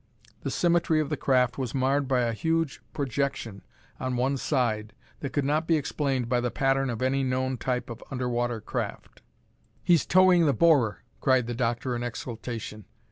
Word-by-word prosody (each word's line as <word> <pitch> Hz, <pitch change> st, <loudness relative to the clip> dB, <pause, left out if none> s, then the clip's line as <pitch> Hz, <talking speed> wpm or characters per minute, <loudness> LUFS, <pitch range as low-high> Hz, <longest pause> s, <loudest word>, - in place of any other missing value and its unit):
The -, -, -3 dB
symmetry 170 Hz, -2 st, +2 dB
of 150 Hz, -2 st, -1 dB
the 150 Hz, -, 0 dB
craft 125 Hz, -3 st, +1 dB
was 130 Hz, -2 st, -3 dB
marred 135 Hz, +1 st, +1 dB
by 130 Hz, -2 st, +2 dB
a 115 Hz, -1 st, 0 dB
huge 165 Hz, +4 st, -1 dB
projection 135 Hz, -7 st, -2 dB, 0.4 s
on 130 Hz, -1 st, -2 dB
one 130 Hz, +3 st, +1 dB
side 120 Hz, -6 st, -1 dB, 0.3 s
that 140 Hz, -, -4 dB
could 140 Hz, +1 st, 0 dB
not 155 Hz, +3 st, +1 dB
be 165 Hz, -, +4 dB
explained 135 Hz, -4 st, -1 dB
by 120 Hz, 0 st, +1 dB
the 125 Hz, -, 0 dB
pattern 135 Hz, +1 st, +1 dB
of 120 Hz, +1 st, -3 dB
any 135 Hz, +1 st, +1 dB
known 130 Hz, 0 st, 0 dB
type 125 Hz, +1 st, -2 dB
of 115 Hz, -1 st, -8 dB
under 125 Hz, -1 st, -2 dB
water 120 Hz, -1 st, -1 dB
craft. -, -, -5 dB, 0.6 s
"He's 170 Hz, -2 st, +3 dB
towing 185 Hz, -3 st, +5 dB
the 140 Hz, -, +3 dB
borer!" 140 Hz, -11 st, +3 dB, 0.2 s
cried 130 Hz, -2 st, +3 dB
the 120 Hz, -, -3 dB
doctor 120 Hz, +1 st, -1 dB
in 120 Hz, -, -3 dB
exultation. 115 Hz, -3 st, -6 dB
130 Hz, 180 wpm, -27 LUFS, 120-140 Hz, 0.6 s, towing